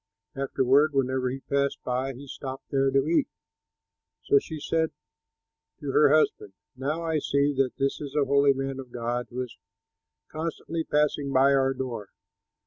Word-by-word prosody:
Afterward, 135 Hz, +2 st, +2 dB
whenever 130 Hz, -1 st, +1 dB
he 135 Hz, +2 st, -5 dB
passed 140 Hz, 0 st, 0 dB
by, 130 Hz, +2 st, -1 dB
he 140 Hz, +3 st, -10 dB
stopped 135 Hz, -1 st, -8 dB
there 135 Hz, 0 st, +3 dB
to 135 Hz, 0 st, +2 dB
eat. 170 Hz, -, +2 dB, 1.0 s
So 420 Hz, -, +5 dB
she 160 Hz, -, -7 dB
said 160 Hz, +2 st, 0 dB, 0.9 s
to 140 Hz, -, -3 dB
her 150 Hz, +1 st, +5 dB
husband, 140 Hz, -9 st, +2 dB, 0.2 s
"Now 145 Hz, +6 st, -2 dB
I 160 Hz, -2 st, 0 dB
see 140 Hz, 0 st, +1 dB
that 135 Hz, -2 st, +1 dB
this 135 Hz, +2 st, -1 dB
is 145 Hz, -1 st, -6 dB
a 145 Hz, -2 st, +3 dB
holy 140 Hz, 0 st, +4 dB
man 135 Hz, 0 st, -4 dB
of 130 Hz, -2 st, -9 dB
God 120 Hz, +1 st, -2 dB
who 125 Hz, +1 st, -3 dB
is 125 Hz, -, -10 dB, 0.8 s
constantly 165 Hz, +1 st, -3 dB
passing 150 Hz, -2 st, +1 dB
by 135 Hz, +1 st, +5 dB
our 135 Hz, -1 st, +2 dB
door. 120 Hz, -6 st, -5 dB
135 Hz, 160 wpm, -27 LUFS, 130-145 Hz, 1.0 s, So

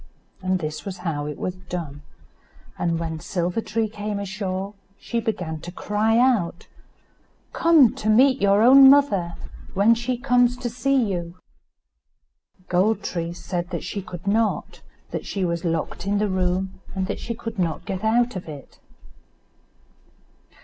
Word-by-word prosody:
This 180 Hz, -3 st, -2 dB
is 190 Hz, -1 st, -5 dB
how 160 Hz, -5 st, -3 dB
it 150 Hz, -, -5 dB
was 185 Hz, -, -3 dB
done; 175 Hz, -5 st, -7 dB, 0.7 s
and 170 Hz, -1 st, -1 dB
when 165 Hz, -1 st, -4 dB
Silver 175 Hz, +4 st, -2 dB
tree 225 Hz, 0 st, -1 dB
came 210 Hz, -1 st, -4 dB
ashore, 195 Hz, 0 st, -4 dB, 0.3 s
she 235 Hz, -, -2 dB
began 180 Hz, -9 st, -3 dB
to 175 Hz, +3 st, -8 dB
cry 210 Hz, +4 st, 0 dB
out: 230 Hz, -9 st, +2 dB, 0.9 s
"Come 320 Hz, -8 st, +5 dB
to 215 Hz, -, -2 dB
meet 260 Hz, +4 st, +5 dB
your 200 Hz, +1 st, +4 dB
own 270 Hz, +2 st, +9 dB
mother, 205 Hz, -12 st, +3 dB, 0.4 s
when 205 Hz, +4 st, +5 dB
she 240 Hz, +2 st, -2 dB
comes 245 Hz, -1 st, +2 dB
to 240 Hz, -2 st, -4 dB
see 275 Hz, +3 st, 0 dB
you," 180 Hz, -6 st, -2 dB, 1.3 s
Gold 195 Hz, +5 st, +2 dB
tree 170 Hz, -1 st, -3 dB
said 175 Hz, 0 st, -4 dB
that -, -, -4 dB
she 200 Hz, -, -4 dB
could 180 Hz, -1 st, -9 dB
not, 215 Hz, +2 st, 0 dB, 0.3 s
that -, -, -4 dB
she 195 Hz, -2 st, -1 dB
was 170 Hz, -1 st, -2 dB
locked 165 Hz, +2 st, -2 dB
in 205 Hz, +1 st, +1 dB
the 210 Hz, 0 st, +1 dB
room, 185 Hz, +1 st, -1 dB
and 190 Hz, -1 st, -1 dB
that -, -, -4 dB
she 230 Hz, -, -4 dB
could 225 Hz, -2 st, -7 dB
not 165 Hz, -4 st, -1 dB
get 190 Hz, +1 st, -4 dB
out 235 Hz, +1 st, +2 dB
of 180 Hz, -3 st, -6 dB
it. 145 Hz, -3 st, -11 dB
195 Hz, 150 wpm, -23 LUFS, 175-225 Hz, 1.3 s, own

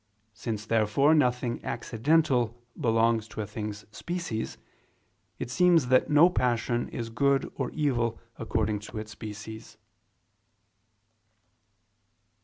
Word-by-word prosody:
Since, 110 Hz, 0 st, -4 dB
therefore, 115 Hz, +7 st, +3 dB
nothing 125 Hz, -5 st, +1 dB
accidental 120 Hz, 0 st, +1 dB, 0.2 s
belongs 115 Hz, -1 st, +2 dB
to 110 Hz, -, -6 dB
a -, -, -3 dB
thing's 105 Hz, 0 st, -6 dB
species, 170 Hz, -11 st, -4 dB, 0.8 s
it 120 Hz, -, -5 dB
seems 165 Hz, -2 st, +4 dB
that 130 Hz, 0 st, +4 dB
no 150 Hz, +3 st, +7 dB
passion 120 Hz, -7 st, 0 dB
is 115 Hz, -1 st, -5 dB
good 140 Hz, +2 st, +1 dB
or -, -, -3 dB
evil 120 Hz, -7 st, 0 dB, 0.2 s
according 110 Hz, -2 st, -1 dB
to 105 Hz, -, -9 dB
its 110 Hz, 0 st, -6 dB
species. 110 Hz, +1 st, -9 dB
115 Hz, 105 wpm, -28 LUFS, 110-135 Hz, 0.8 s, no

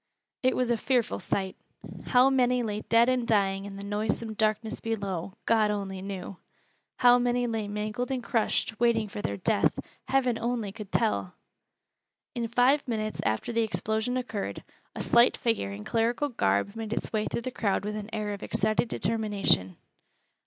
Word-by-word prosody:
It 255 Hz, 0 st, +2 dB
was 250 Hz, -1 st, +1 dB
a 235 Hz, -, +2 dB
fearful 245 Hz, 0 st, 0 dB
sight. 190 Hz, -1 st, -2 dB, 0.5 s
How 255 Hz, +1 st, +5 dB
many 250 Hz, -2 st, +3 dB
lay 210 Hz, -1 st, -3 dB
dead 230 Hz, +2 st, +4 dB
and 255 Hz, -2 st, +1 dB
dying 195 Hz, -3 st, +2 dB
in 200 Hz, -1 st, -7 dB
the 200 Hz, -, -7 dB
noisome 215 Hz, +2 st, -2 dB
darkness 215 Hz, +1 st, 0 dB
below, 195 Hz, -5 st, -3 dB
God 220 Hz, -2 st, +3 dB
only 195 Hz, -2 st, -3 dB
knew! 195 Hz, -1 st, -6 dB, 0.6 s
How 245 Hz, 0 st, +6 dB
many 245 Hz, 0 st, +1 dB
lay 225 Hz, -3 st, -2 dB
mangled 210 Hz, +4 st, -3 dB
and 260 Hz, -2 st, -2 dB
crushed, 225 Hz, -1 st, 0 dB
waiting 230 Hz, -2 st, +3 dB
for 205 Hz, 0 st, -6 dB
their 100 Hz, -, -2 dB
death, -, -, +2 dB, 0.3 s
Heaven 255 Hz, -3 st, +1 dB
only 235 Hz, -4 st, -2 dB
could 205 Hz, -1 st, -9 dB
tell! 215 Hz, -5 st, 0 dB, 1.0 s
In 235 Hz, -3 st, -2 dB
five 255 Hz, +5 st, +3 dB
minutes 215 Hz, -2 st, -2 dB
after 110 Hz, -, -1 dB
the 230 Hz, -, +2 dB
explosion 220 Hz, +2 st, -1 dB
occurred, 230 Hz, -5 st, -4 dB, 0.3 s
a -, -, -2 dB
slight 235 Hz, +1 st, +5 dB
figure 225 Hz, -, 0 dB
in 100 Hz, +1 st, -7 dB
clerical 235 Hz, -, 0 dB
garb 100 Hz, -, 0 dB
made 225 Hz, -1 st, -4 dB
its -, -, -4 dB
way 215 Hz, -1 st, 0 dB
through -, -, -2 dB
the 255 Hz, -, -4 dB
crowd 200 Hz, -4 st, 0 dB
with 210 Hz, 0 st, -3 dB
an 210 Hz, 0 st, -5 dB
air 210 Hz, -2 st, -2 dB
of 200 Hz, -, -7 dB
excited 215 Hz, +2 st, 0 dB
determination. 205 Hz, -, 0 dB
220 Hz, 170 wpm, -28 LUFS, 205-240 Hz, 1.0 s, How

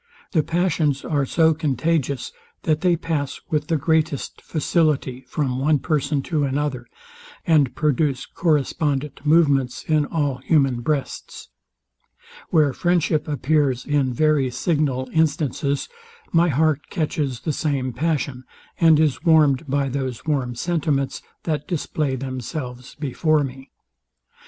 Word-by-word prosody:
The 160 Hz, -, +3 dB
passions 165 Hz, -4 st, 0 dB
are 145 Hz, -4 st, 0 dB
so 160 Hz, +2 st, +3 dB
contagious, 145 Hz, -2 st, -1 dB, 0.3 s
that 155 Hz, -1 st, +1 dB
they 180 Hz, -2 st, +3 dB
pass 155 Hz, -4 st, -3 dB
with 150 Hz, -1 st, 0 dB
the 165 Hz, -, +1 dB
greatest 155 Hz, -1 st, 0 dB
facility 150 Hz, -5 st, 0 dB
from 130 Hz, -2 st, -1 dB
one 150 Hz, +2 st, +3 dB
person 145 Hz, -1 st, -1 dB
to 155 Hz, -4 st, -1 dB
another, 135 Hz, -2 st, -2 dB, 0.6 s
and 150 Hz, -6 st, +3 dB
produce 145 Hz, -3 st, +1 dB
correspondent 150 Hz, -3 st, -1 dB
movements 145 Hz, -5 st, +3 dB
in 155 Hz, -2 st, +1 dB
all 145 Hz, -5 st, -1 dB
human 135 Hz, -3 st, +2 dB
breasts. 140 Hz, +2 st, -3 dB, 1.0 s
Where 150 Hz, -4 st, +3 dB
friendship 165 Hz, -1 st, +1 dB
appears 145 Hz, -3 st, +1 dB
in 145 Hz, -3 st, +1 dB
very 145 Hz, 0 st, +2 dB
signal 135 Hz, -1 st, 0 dB
instances, 145 Hz, -3 st, 0 dB, 0.4 s
my 170 Hz, +1 st, +4 dB
heart 155 Hz, 0 st, +1 dB
catches 150 Hz, -5 st, -2 dB
the 155 Hz, -, -2 dB
same 135 Hz, -4 st, -1 dB
passion, 140 Hz, -2 st, -1 dB, 0.4 s
and 160 Hz, -2 st, +6 dB
is 155 Hz, -4 st, +1 dB
warmed 155 Hz, -3 st, +4 dB
by 140 Hz, 0 st, 0 dB
those 130 Hz, -3 st, -4 dB
warm 135 Hz, -6 st, -1 dB
sentiments, 145 Hz, -2 st, -1 dB, 0.2 s
that 155 Hz, -3 st, -2 dB
display 150 Hz, -5 st, -1 dB
themselves 130 Hz, 0 st, -6 dB
before 150 Hz, +1 st, +1 dB
me. 135 Hz, 0 st, -7 dB
145 Hz, 125 wpm, -22 LUFS, 135-155 Hz, 1.0 s, and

